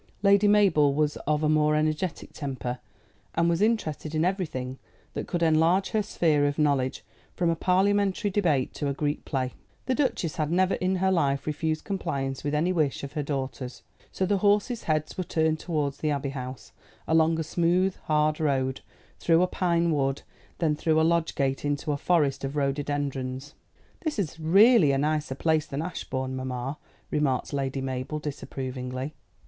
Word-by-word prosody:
Lady 200 Hz, +1 st, +5 dB
Mabel 190 Hz, -9 st, +4 dB
was 150 Hz, 0 st, +1 dB
of 150 Hz, 0 st, +1 dB
a -, -, +3 dB
more 150 Hz, 0 st, +3 dB
energetic 155 Hz, +3 st, -1 dB
temper, 125 Hz, -4 st, -4 dB, 0.6 s
and 170 Hz, +1 st, +3 dB
was 170 Hz, +1 st, +1 dB
interested 160 Hz, -8 st, 0 dB
in 155 Hz, +2 st, +2 dB
everything 140 Hz, -9 st, -2 dB, 0.3 s
that -, -, -4 dB
could 175 Hz, -1 st, -1 dB
enlarge 165 Hz, +4 st, +3 dB
her 215 Hz, -, +2 dB
sphere 155 Hz, -8 st, +2 dB
of 145 Hz, -, -2 dB
knowledge, 140 Hz, -4 st, +1 dB, 0.3 s
from 170 Hz, -2 st, +1 dB
a -, -, 0 dB
parliamentary 200 Hz, +3 st, +2 dB
debate 165 Hz, -10 st, +1 dB
to 145 Hz, -, -3 dB
a 140 Hz, -, -1 dB
Greek 145 Hz, 0 st, -2 dB
play. 130 Hz, -3 st, -2 dB, 0.3 s
The 260 Hz, -, +1 dB
Duchess 255 Hz, -, -1 dB
had 155 Hz, -1 st, -1 dB
never 185 Hz, +2 st, +3 dB
in 185 Hz, +1 st, 0 dB
her 190 Hz, +1 st, +2 dB
life 140 Hz, -6 st, +1 dB
refused 155 Hz, +1 st, -2 dB
compliance 135 Hz, -9 st, -3 dB
with 145 Hz, +1 st, -1 dB
any 170 Hz, +5 st, +1 dB
wish 150 Hz, -6 st, 0 dB
of 140 Hz, -, -6 dB
her 150 Hz, -, -1 dB
daughter's, 135 Hz, -3 st, -4 dB, 0.3 s
so 190 Hz, -, -1 dB
the 200 Hz, +1 st, +1 dB
horses' 210 Hz, +4 st, +2 dB
heads 155 Hz, +3 st, -1 dB
were -, -, +1 dB
turned 160 Hz, -2 st, 0 dB
towards 150 Hz, -5 st, -2 dB
the 155 Hz, -, 0 dB
Abbey 140 Hz, -1 st, -1 dB
House, 130 Hz, -2 st, -7 dB, 0.4 s
along 160 Hz, 0 st, +3 dB
a -, -, 0 dB
smooth 175 Hz, +4 st, +1 dB
hard 150 Hz, 0 st, +2 dB
road 135 Hz, -4 st, 0 dB, 0.4 s
through 165 Hz, +1 st, +4 dB
a -, -, +5 dB
pine 170 Hz, -2 st, +1 dB
wood, 135 Hz, -2 st, 0 dB, 0.3 s
then 155 Hz, -3 st, +1 dB
through 160 Hz, +1 st, +2 dB
a -, -, +4 dB
lodge 170 Hz, 0 st, +1 dB
gate 135 Hz, -1 st, 0 dB
into 145 Hz, +1 st, -1 dB
a -, -, +1 dB
forest 150 Hz, -4 st, +1 dB
of 135 Hz, +1 st, -3 dB
rhododendrons. 140 Hz, -1 st, -2 dB, 0.5 s
"This 315 Hz, -6 st, -3 dB
is 165 Hz, -5 st, -3 dB
really 190 Hz, -, +6 dB
a -, -, +2 dB
nicer 150 Hz, -1 st, 0 dB
place 155 Hz, +1 st, +1 dB
than 140 Hz, +3 st, -3 dB
Ashbourne, 130 Hz, -6 st, -4 dB
mamma," 130 Hz, +2 st, -4 dB, 0.3 s
remarked 140 Hz, -2 st, 0 dB
Lady 135 Hz, -1 st, -2 dB
Mabel 130 Hz, +3 st, -3 dB
disapprovingly. 130 Hz, -2 st, -5 dB
155 Hz, 175 wpm, -27 LUFS, 140-175 Hz, 0.6 s, really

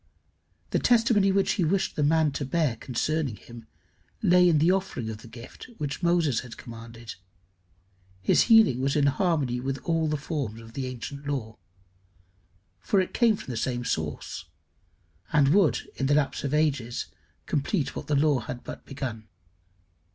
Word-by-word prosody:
The -, -, +2 dB
testimony 225 Hz, -5 st, +4 dB
which 195 Hz, 0 st, +2 dB
he 195 Hz, -, 0 dB
wished 190 Hz, +4 st, 0 dB
the -, -, -1 dB
man 155 Hz, +1 st, +3 dB
to 140 Hz, -, -3 dB
bear 140 Hz, -2 st, 0 dB
concerning 135 Hz, +2 st, -2 dB
him 115 Hz, +1 st, -13 dB, 0.6 s
lay 180 Hz, 0 st, +6 dB
in 160 Hz, -, +4 dB
the 160 Hz, +4 st, +4 dB
offering 185 Hz, -12 st, -2 dB
of 105 Hz, -, -8 dB
the 115 Hz, -, -13 dB
gift 115 Hz, -, -11 dB
which 145 Hz, 0 st, -4 dB
Moses 170 Hz, -8 st, +2 dB
had 120 Hz, -2 st, -9 dB
commanded. 115 Hz, -1 st, -9 dB, 1.1 s
His 95 Hz, -, +3 dB
healing 220 Hz, -, +6 dB
was 135 Hz, +1 st, +1 dB
in 145 Hz, -2 st, +3 dB
harmony 140 Hz, -5 st, +1 dB
with 135 Hz, +2 st, -2 dB
all 165 Hz, -2 st, +1 dB
the 150 Hz, 0 st, 0 dB
forms 140 Hz, -7 st, -4 dB
of 115 Hz, 0 st, -13 dB
the 130 Hz, 0 st, -3 dB
ancient 140 Hz, +3 st, -7 dB
law; 120 Hz, -6 st, -3 dB, 1.2 s
for 200 Hz, -, +1 dB
it 185 Hz, -, -1 dB
came 230 Hz, -3 st, +4 dB
from 140 Hz, -, -8 dB
the -, -, -4 dB
same 120 Hz, +1 st, -2 dB
source, 80 Hz, -7 st, -3 dB, 0.9 s
and 145 Hz, -2 st, +4 dB
would 155 Hz, -, +3 dB
in 135 Hz, -, -1 dB
the 145 Hz, -, +3 dB
lapse 150 Hz, -2 st, 0 dB
of 140 Hz, -, -2 dB
ages 145 Hz, -6 st, 0 dB, 0.4 s
complete 145 Hz, +1 st, -1 dB
what -, -, -6 dB
the 150 Hz, -, +1 dB
law 145 Hz, -1 st, +3 dB
had 120 Hz, +1 st, -7 dB
but -, -, -8 dB
begun. 120 Hz, -6 st, -5 dB
140 Hz, 165 wpm, -27 LUFS, 120-165 Hz, 1.2 s, lay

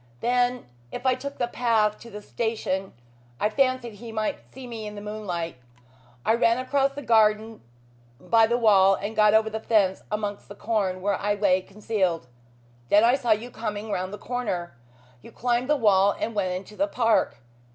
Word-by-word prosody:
Then 245 Hz, +1 st, +1 dB, 0.3 s
if -, -, -7 dB
I 260 Hz, -, +4 dB
took 280 Hz, +2 st, -6 dB
the 240 Hz, -, 0 dB
path 225 Hz, -3 st, +1 dB
to 235 Hz, -, -12 dB
the 210 Hz, -1 st, -9 dB
station 210 Hz, -5 st, -3 dB, 0.5 s
I 210 Hz, -, +1 dB
fancied 255 Hz, -2 st, 0 dB
he 230 Hz, +2 st, -9 dB
might 220 Hz, +5 st, -3 dB
see 265 Hz, -1 st, -10 dB
me 225 Hz, -3 st, -6 dB
in 210 Hz, -, -8 dB
the -, -, -6 dB
moonlight. 190 Hz, -7 st, -5 dB, 0.7 s
I 220 Hz, -, +4 dB
ran 230 Hz, 0 st, +3 dB
across 275 Hz, +2 st, 0 dB
the 285 Hz, +1 st, -7 dB
garden 220 Hz, -1 st, +2 dB, 0.6 s
by 225 Hz, +4 st, +3 dB
the 235 Hz, +1 st, +1 dB
wall 195 Hz, -4 st, +5 dB
and 205 Hz, +3 st, -5 dB
got 210 Hz, 0 st, +5 dB
over 220 Hz, 0 st, +4 dB
the 220 Hz, -, -3 dB
fence 205 Hz, -4 st, +2 dB
amongst 210 Hz, -1 st, -3 dB
the 205 Hz, -, -10 dB
corn, 200 Hz, -5 st, -1 dB
where 200 Hz, -1 st, 0 dB
I 205 Hz, +1 st, +1 dB
lay 195 Hz, -2 st, +2 dB
concealed. 190 Hz, -, -2 dB, 0.6 s
Then 205 Hz, +2 st, +5 dB
I 235 Hz, +2 st, +5 dB
saw 260 Hz, -3 st, -1 dB
you 220 Hz, +3 st, +1 dB
coming 210 Hz, -2 st, -5 dB
round 185 Hz, -1 st, -2 dB
the 205 Hz, -, -6 dB
corner. 200 Hz, -, -4 dB, 0.5 s
You -, -, -13 dB
climbed 245 Hz, +3 st, -1 dB
the 300 Hz, -, +4 dB
wall 200 Hz, -4 st, +4 dB
and 230 Hz, -, -2 dB
went 190 Hz, -3 st, -1 dB
into 190 Hz, +3 st, -8 dB
the 295 Hz, +5 st, +1 dB
park. 230 Hz, -, +1 dB
215 Hz, 185 wpm, -25 LUFS, 205-240 Hz, 0.7 s, wall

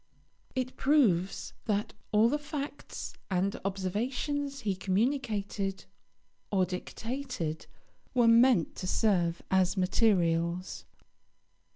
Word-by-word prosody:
It 255 Hz, 0 st, -2 dB
proves 210 Hz, -, +2 dB
that 210 Hz, -2 st, -1 dB, 0.2 s
all 215 Hz, +2 st, +5 dB
the 295 Hz, +5 st, +1 dB
facts 295 Hz, -1 st, -6 dB, 0.2 s
and 190 Hz, +1 st, 0 dB
observations 250 Hz, +9 st, -2 dB
he 200 Hz, -5 st, 0 dB
communicated 200 Hz, -1 st, -1 dB, 0.7 s
or 190 Hz, -2 st, +3 dB
dictated 185 Hz, -, -4 dB, 0.5 s
were 240 Hz, -2 st, +5 dB
meant 230 Hz, -6 st, +5 dB
to 185 Hz, -, -4 dB
serve 175 Hz, -6 st, +1 dB
as 190 Hz, +1 st, +3 dB
materials. 180 Hz, -3 st, +1 dB
205 Hz, 90 wpm, -30 LUFS, 185-255 Hz, 0.7 s, all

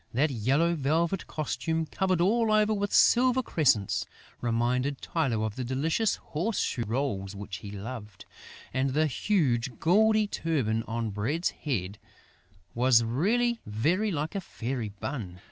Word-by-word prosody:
That 145 Hz, +4 st, +2 dB
yellow 135 Hz, +9 st, +2 dB
velvet 165 Hz, +5 st, 0 dB
costume, 160 Hz, +1 st, -2 dB
covered 185 Hz, +1 st, 0 dB
all 220 Hz, +4 st, +3 dB
over 215 Hz, 0 st, +3 dB
with 205 Hz, -1 st, -1 dB
silver 255 Hz, +1 st, +4 dB
crescents, 125 Hz, -, +1 dB, 0.3 s
reminded 125 Hz, +4 st, 0 dB
Tylô 125 Hz, -10 st, -1 dB
of 110 Hz, -1 st, -4 dB
the 130 Hz, -, -3 dB
delicious 155 Hz, -, 0 dB
horse 190 Hz, +8 st, -3 dB
shoe 120 Hz, -3 st, -1 dB
rolls 105 Hz, -6 st, -2 dB
which 100 Hz, -1 st, -6 dB
he 100 Hz, -, -9 dB
loved; 105 Hz, -1 st, -8 dB, 0.5 s
and 130 Hz, 0 st, 0 dB
the 155 Hz, +1 st, +3 dB
huge, 130 Hz, -, 0 dB
gaudy 215 Hz, +5 st, +4 dB
turban 140 Hz, -, -1 dB
on 115 Hz, -1 st, -2 dB
Bread's 130 Hz, -, -1 dB
head 100 Hz, -, -4 dB, 0.7 s
was 120 Hz, -1 st, +4 dB
really 225 Hz, -, +1 dB
very 160 Hz, -, +1 dB
like 155 Hz, -3 st, -2 dB
a 200 Hz, -, -2 dB
fairy 125 Hz, -, -4 dB
bun! 100 Hz, -3 st, -6 dB
140 Hz, 140 wpm, -28 LUFS, 115-175 Hz, 0.7 s, silver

